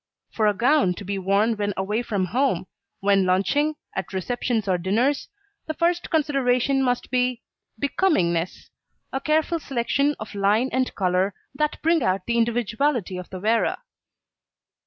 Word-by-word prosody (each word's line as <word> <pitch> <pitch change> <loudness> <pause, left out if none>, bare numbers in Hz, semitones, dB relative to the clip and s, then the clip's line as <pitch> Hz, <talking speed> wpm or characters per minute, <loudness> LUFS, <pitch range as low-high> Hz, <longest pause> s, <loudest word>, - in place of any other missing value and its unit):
For 215 -2 +1
a 210 - +2
gown 245 -4 +3
to 200 - -8
be 195 +1 -2
worn 200 +4 +2
when 205 -1 -1
away 210 +4 -1
from 205 -6 -1
home, 230 -2 0 0.4
when 195 -1 +3
lunching, 280 +12 +2 0.2
at 190 0 -4
receptions 225 +2 -1
or 185 -2 +1
dinners, 230 +11 0 0.4
the 315 - -3
first 345 +2 0
consideration 275 -4 +2
must 245 -2 -1
be 250 -1 0 0.4
becomingness, 185 - 0 0.4
a 270 - -1
careful 315 +2 +1
selection 280 +2 0
of 215 - -7
line 210 +6 +2
and 260 0 0
colour 185 0 +1 0.2
that 300 +2 -1
bring 330 0 +3
out 185 -3 0
the 235 0 +1
individuality 235 -2 0
of 180 - -8
the 185 - -7
wearer. 220 +4 +1
235 Hz, 150 wpm, -24 LUFS, 195-275 Hz, 0.4 s, gown